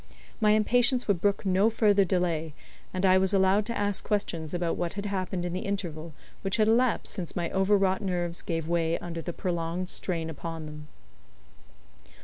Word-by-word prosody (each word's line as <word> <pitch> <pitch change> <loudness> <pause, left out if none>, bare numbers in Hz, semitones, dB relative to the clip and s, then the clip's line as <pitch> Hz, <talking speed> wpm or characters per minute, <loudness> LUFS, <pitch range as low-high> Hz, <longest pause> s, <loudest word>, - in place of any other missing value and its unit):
My 210 -2 +4
impatience 245 +4 +3
would 195 -5 +1
brook 200 +1 +1
no 195 +3 +4
further 210 -3 +4
delay, 170 -4 -1 0.4
and 185 +1 -1
I 185 0 +6
was 190 +1 +2
allowed 195 +2 +3
to 235 - -2
ask 205 -1 -1
questions 170 -7 -2
about 175 -2 -1
what 175 -1 -2
had 205 0 -5
happened 185 -3 -2
in 175 - -3
the 180 - -2
interval 170 -6 -4 0.3
which 195 +2 -1
had 215 -1 +3
elapsed 235 +2 +2
since 180 -5 -5
my 170 -1 -2
over 195 +2 +3
wrought 190 0 +1
nerves 175 -3 -2
gave 165 -2 -3
way 170 -1 +1
under 170 -1 -6
the 175 - -4
prolonged 175 +1 -3
strain 165 -5 -2
upon 160 +1 -6
them. 150 0 -9
185 Hz, 180 wpm, -28 LUFS, 170-205 Hz, 0.4 s, I